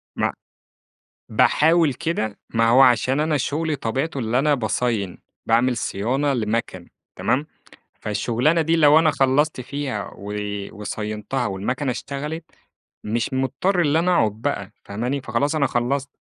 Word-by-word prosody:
مع - - 0 1.0
باحاول 160 -2 +3
كده، 160 -12 -2
ما 115 0 +2
هو 125 +3 +6
عشان 130 +2 +4
أنا 155 0 +1
شُغلي 150 +3 -1
طبيعته 135 +6 -2
اللي 120 0 0
أنا 145 +2 +3
باصاين 110 -5 -1 0.3
باعمل 120 +2 +3
صيانة 130 +8 0
لمَكَن، 110 -6 -2 0.3
تمام؟ 140 +4 0 0.6
فالشُّغلانة 120 +9 +1
دي 165 +1 +2
لو 155 -1 +6
أنا 160 -1 +4
خلَّصت 140 +1 +2
فيها 130 -6 -4
و 100 +1 -7 0.4
وصاينتها، 105 +4 -4
والمَكَنة 125 +8 -2
اشتغلِت، 150 +6 -5 0.6
مش 115 +4 -1
مُضطر 155 +8 +1
إن 150 -1 +2
أنا 175 +3 +2
أقعد 110 -8 +3
بقى، 110 -8 -2
فاهماني؟ 125 +7 -3
فخلاص 130 +4 -1
أنا 145 -3 +2
خلّصت. 130 +3 -1
130 Hz, 135 wpm, -22 LUFS, 115-150 Hz, 1.0 s, هو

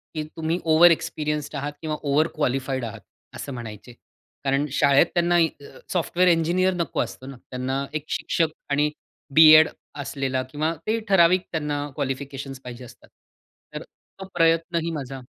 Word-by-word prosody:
की 155 - -2
तुम्ही 165 +2 -1
over 165 +2 +6
experienced 150 -2 -2
आहात 145 +1 -4
किंवा 155 -1 -3
ओव्हर 150 +2 +2
क्वालिफाईड 135 -3 -1
आहात 115 -1 -8 0.3
असं 140 - -6
म्हणायचे. 120 -1 -9 0.5
कारण 135 +1 +1
शाळेत 140 0 +4
त्यांना 175 0 +2 0.6
सॉफ्टवेअर 180 +1 +2
इंजिनिअर 175 +3 +2
नको 170 -2 -3
असतो 130 - -6
ना, 135 -1 -9
त्यांना 130 +2 -2
एक 155 -1 -3
शिक्षक 165 -2 0 0.2
आणि 145 +1 +2 0.5
बी-एड 155 0 +9 0.3
असलेला 135 -2 -2
किंवा 155 +3 -1
ते 225 +1 +1
ठराविक 185 -1 +4
त्यांना 150 -2 -2
क्वालिफिकेशन्स 135 -1 -5
पाहिजे 125 0 -9
असतात. - - -17 0.7
तर - - -5
तो 190 - -15
प्रयत्नही 165 0 +1
माझा 135 -4 -6
150 Hz, 140 wpm, -24 LUFS, 135-165 Hz, 0.7 s, बी-एड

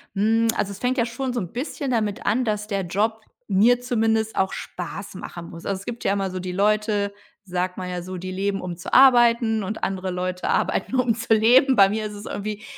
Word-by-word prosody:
hm, 225 +3 +2
also, 200 - -1
es 195 - -9
fängt 255 +2 0
ja 235 - +2
schon 250 +2 -4
so 245 - -1
'n 180 -4 -5
bisschen 270 +1 -3
damit 215 -2 -1
an, 250 +4 +1
dass 210 -1 -2
der 200 -2 -1
Job 215 +5 -1 0.3
mir 225 +5 +4
zumindest 225 -2 0
auch 190 0 0
Spaß 185 +3 -7
machen 170 -2 -8
muss. 170 0 -11
Also, 195 -1 -2
es 200 - -12
gibt 240 -1 -6
ja 195 - +2
immer 195 -1 -1
so 185 - -4
die 185 0 -4
Leute, 205 +1 +1 0.3
sagt 180 0 -2
man 185 -1 -5
ja 180 -1 -4
so, 185 +1 -6
die 185 +1 -6
leben, 195 +1 -2
um 175 -2 -5
zu - - -8
arbeiten, 235 -4 +5
und 210 +3 -5
andere 190 -1 -2
Leute 180 0 -3
arbeiten, 215 +5 0
um 250 -3 +2
zu 230 0 +1
leben. 250 +5 +5
Bei 195 -2 +6
mir 215 +1 -2
ist 210 - -5
es 205 +1 -9
irgendwie 210 +1 -5
210 Hz, 230 wpm, -23 LUFS, 190-230 Hz, 0.3 s, Bei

